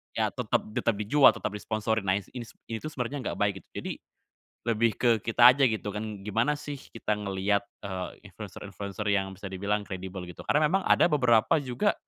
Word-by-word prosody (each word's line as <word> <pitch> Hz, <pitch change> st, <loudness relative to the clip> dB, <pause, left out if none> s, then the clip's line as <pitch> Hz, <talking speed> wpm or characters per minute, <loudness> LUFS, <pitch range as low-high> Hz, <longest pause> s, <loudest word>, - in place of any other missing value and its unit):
ya -, -, +1 dB
tetep -, -, 0 dB
tetep 115 Hz, 0 st, 0 dB
dijual, 120 Hz, +7 st, +6 dB
tetep 110 Hz, -, -3 dB
disponsori, 110 Hz, +1 st, -1 dB
nah 95 Hz, -1 st, +1 dB
ini 100 Hz, -, -5 dB, 0.2 s
s -, -, -16 dB, 0.2 s
ini 110 Hz, -, -2 dB
tuh, 155 Hz, -, -5 dB
sebenernya 140 Hz, 0 st, -4 dB
enggak -, -, -3 dB
baik 100 Hz, -1 st, 0 dB
gitu. -, -, -40 dB
Jadi -, -, -3 dB, 0.8 s
lebih 115 Hz, 0 st, +3 dB
ke 120 Hz, -, +3 dB
kita 120 Hz, +2 st, +7 dB
aja 140 Hz, -, 0 dB
gitu 105 Hz, -2 st, -3 dB
kan. 105 Hz, -2 st, -5 dB
Gimana 115 Hz, +8 st, +1 dB
sih 145 Hz, -2 st, -6 dB
kita 115 Hz, -2 st, -3 dB
ngeliat, 100 Hz, 0 st, 0 dB, 0.2 s
eee, 95 Hz, -2 st, -6 dB
influencer-influencer 100 Hz, +1 st, -7 dB
yang 95 Hz, -1 st, +1 dB
bisa 100 Hz, -, -7 dB
dibilang 100 Hz, +2 st, -1 dB
kredibel 95 Hz, -1 st, -6 dB
gitu, 90 Hz, -, -10 dB
karena 150 Hz, +1 st, +4 dB
memang 195 Hz, 0 st, +2 dB
ada -, -, +5 dB
beberapa 125 Hz, +1 st, +4 dB
juga 135 Hz, +11 st, 0 dB
110 Hz, 190 wpm, -28 LUFS, 100-120 Hz, 0.8 s, kita